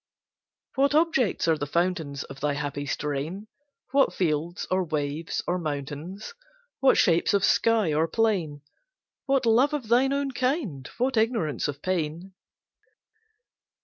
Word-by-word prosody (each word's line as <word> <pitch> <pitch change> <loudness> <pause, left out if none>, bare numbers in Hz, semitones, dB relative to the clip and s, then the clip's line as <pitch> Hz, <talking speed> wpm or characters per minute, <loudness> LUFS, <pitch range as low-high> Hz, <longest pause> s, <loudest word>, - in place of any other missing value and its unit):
What 280 +2 +2
objects 300 - +2
are 160 -2 +2
the 145 - -3
fountains 165 -4 -1
Of 135 -1 -11
thy 145 0 0
happy 145 0 -4
strain? 150 +9 -3 0.5
What 275 0 +3
fields, 165 0 -1
or 185 0 +2
waves, 155 0 -3
or 180 +1 -1
mountains? 155 - -5 0.5
What 270 -1 +4
shapes 170 +3 +3
of 200 - +3
sky 220 -8 +3
or 160 +2 +2
plain? 170 -8 0 0.6
What 270 -2 +2
love 245 +6 +4
of 250 -7 -5
thine 255 +3 +4
own 280 0 -1
kind? 250 - -2
what 255 0 0
ignorance 220 - 0
of 145 0 -6
pain? 175 +1 -2
180 Hz, 135 wpm, -26 LUFS, 150-235 Hz, 0.6 s, What